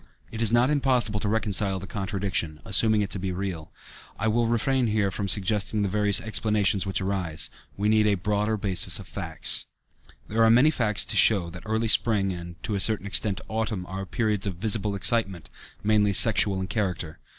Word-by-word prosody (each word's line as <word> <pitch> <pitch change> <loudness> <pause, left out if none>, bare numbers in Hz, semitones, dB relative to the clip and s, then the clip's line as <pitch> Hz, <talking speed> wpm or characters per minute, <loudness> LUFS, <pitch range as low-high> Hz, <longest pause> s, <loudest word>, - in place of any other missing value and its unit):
It 115 - -6
is 115 -2 +3
not 120 +4 +3
impossible 125 -7 +1
to 105 - -3
reconcile 105 -3 0
the 95 - -8
contradiction, 95 -5 -3
assuming 110 +2 +4
it 100 - -4
to 100 - 0
be 95 0 -4
real, 90 -4 -6 0.5
but - - -7
I - - +1
will 115 +1 0
refrain 120 +2 0
here 105 -2 0
from 100 +1 -4
suggesting 105 +2 0
the 100 - -1
various 105 0 +4
explanations 105 -2 0
which 95 - -1
arise. 95 -5 -2 0.3
We 100 +2 -1
need 110 0 +3
a 105 - +2
broader 105 +3 -2
basis 95 -3 +1
of - - -9
facts. - - 0 0.6
There 115 +2 +1
are 110 - +5
many 125 +7 +5
facts 110 -8 0
to - - -5
show 95 -6 +3
that 90 - -10
early 110 +1 -1
spring 105 -4 +3
and, 85 -1 -9
to 105 - -4
a 100 - -1
certain 105 0 +2
extent, 100 0 -1
autumn 110 -4 -3
are 95 +1 -7
periods 105 -3 -1
of 95 - -4
visible 105 +1 0
excitement, 100 -4 -1 0.3
mainly 105 -1 +2
sexual 100 -2 +5
in 95 - -3
character. 90 -6 -4
105 Hz, 195 wpm, -25 LUFS, 95-110 Hz, 0.6 s, are